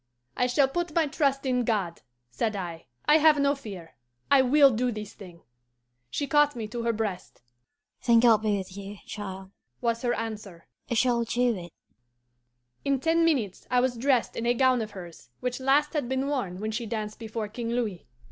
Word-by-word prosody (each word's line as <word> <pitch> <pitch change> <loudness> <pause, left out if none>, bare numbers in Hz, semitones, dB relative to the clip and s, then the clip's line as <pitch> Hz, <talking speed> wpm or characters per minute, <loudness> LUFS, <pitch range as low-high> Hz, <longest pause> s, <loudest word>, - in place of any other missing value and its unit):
"'I 250 - +2
shall 270 +2 +3
put 340 +3 -3
my 330 -2 +4
trust 275 -2 0
in 250 -1 +1
God,' 200 -7 -1 0.3
said 210 - -1
I. 170 -4 -6 0.2
'I 300 - +6
have 310 -1 +6
no 280 0 +3
fear. 190 - -10 0.3
I 280 -1 +7
will 275 +2 +6
do 245 +2 0
this 210 -2 -7
thing.' 180 -5 -13 0.7
She 285 - -2
caught 295 0 +3
me 225 -3 -4
to 235 +2 -4
her 230 0 +1
breast. 210 - -4 0.6
'Then 235 -2 +5
God 230 -2 +6
be 210 -2 +1
with 190 -1 -7
you, 200 +1 -8
child,' 195 -2 -7 0.3
was 230 -1 -1
her 240 -2 0
answer; 210 -6 -6 0.2
'you 235 - -2
shall 235 0 +2
do 240 +1 +1
it.' 175 -3 -9 1.1
In 275 -1 +1
ten 330 +4 +2
minutes 255 - 0
I 250 - +3
was 250 0 +1
dressed 255 0 +1
in 230 - -2
a 240 - +3
gown 255 -1 +3
of 215 - -4
hers, 165 -10 -11
which 250 0 -3
last 280 +4 +2
had 290 -6 -1
been 265 +1 0
worn 245 -11 -2
when 215 +1 -3
she 230 +1 -3
danced 215 -1 -4
before 225 -1 -4
King 230 +2 -5
Louis. 225 - -2
235 Hz, 195 wpm, -27 LUFS, 205-265 Hz, 1.1 s, I